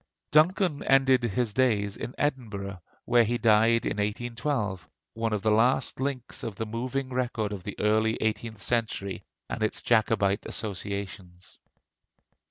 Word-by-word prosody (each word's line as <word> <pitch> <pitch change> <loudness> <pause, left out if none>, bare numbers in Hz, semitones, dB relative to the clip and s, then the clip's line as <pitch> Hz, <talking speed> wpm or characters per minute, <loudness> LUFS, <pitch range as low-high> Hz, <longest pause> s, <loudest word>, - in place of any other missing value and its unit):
Duncan 160 0 +3
ended 135 -1 +4
his 120 -1 -1
days 105 -5 +1
in 120 +3 -6
Edinburgh, 105 - -3 0.2
where 120 -1 +5
he 120 +2 0
died 115 +1 +4
in - - -1
1812, 105 - -2 0.2
one 115 0 -2
of 105 -2 -1
the 110 - +3
last 120 +5 +2
links 130 -2 -2
of 115 -6 -5
the 110 - -3
moving 130 +4 -3
record 120 -4 -1
of 95 -3 -7
the 100 - -7
early 110 +1 +2
eighteenth 110 -1 -2
century 110 -5 -1 0.3
and - - -5
its 110 - 0
Jacobite 110 -3 +2
associations. 100 -3 -6
110 Hz, 140 wpm, -27 LUFS, 105-125 Hz, 0.3 s, where